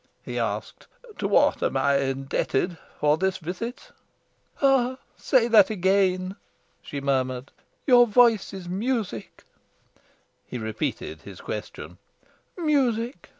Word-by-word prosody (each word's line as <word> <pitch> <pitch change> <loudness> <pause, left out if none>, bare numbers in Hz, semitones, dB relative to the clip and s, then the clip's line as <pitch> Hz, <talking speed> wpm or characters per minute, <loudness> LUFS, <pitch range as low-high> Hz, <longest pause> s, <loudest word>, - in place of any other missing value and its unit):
He - - -3
asked: - - -4 0.3
"To - - 0
what - - +3
am - - 0
I 140 0 +3
indebted 135 +4 -1 0.2
for 150 +1 +3
this 190 0 0
visit?" 185 +9 -6 0.7
"Ah, 260 -2 +3 0.2
say 250 -4 +2
that 215 -5 +6
again!" 190 -1 +1 0.4
she 140 - -6
murmured. 130 -1 -1 0.3
"Your 245 -3 +6
voice 230 -2 +4
is 190 -3 -8
music." 200 - -3 1.0
He 125 - -5
repeated 110 -8 -4
his - - -11
question. 90 +5 -7 0.6
"Music!" 260 -7 0
190 Hz, 110 wpm, -25 LUFS, -, 1.0 s, that